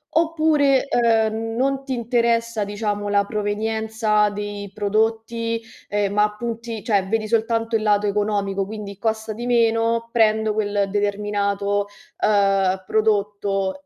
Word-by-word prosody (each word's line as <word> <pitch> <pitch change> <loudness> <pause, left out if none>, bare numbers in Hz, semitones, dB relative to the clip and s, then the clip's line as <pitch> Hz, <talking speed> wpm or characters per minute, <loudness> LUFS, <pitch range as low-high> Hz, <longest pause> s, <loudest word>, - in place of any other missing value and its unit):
oppure, 310 -4 +3
ehm, 225 -2 +1
non 270 +2 0
ti 270 -1 -4
interessa, 235 -2 0
diciamo, 205 0 -3
la 200 0 +2
provenienza 215 0 0
dei 205 -1 -6
prodotti, 225 +3 -1 0.3
ehm, 205 -1 0
ma 210 0 +2
punti 230 -1 -5
cioè, 200 -4 +1
vedi 215 +1 -1
soltanto 225 0 0
il 220 - +1
lato 210 -1 +2
economico; 200 -1 0
quindi 205 -2 -7
costa 220 0 -2
di 240 +3 -6
meno, 230 -1 +2
prendo 220 -2 +2
quel 205 -2 0
determinato, 205 0 0 0.3
uhm, 195 -2 +2
prodotto. 205 -2 0
215 Hz, 120 wpm, -22 LUFS, 205-230 Hz, 0.3 s, oppure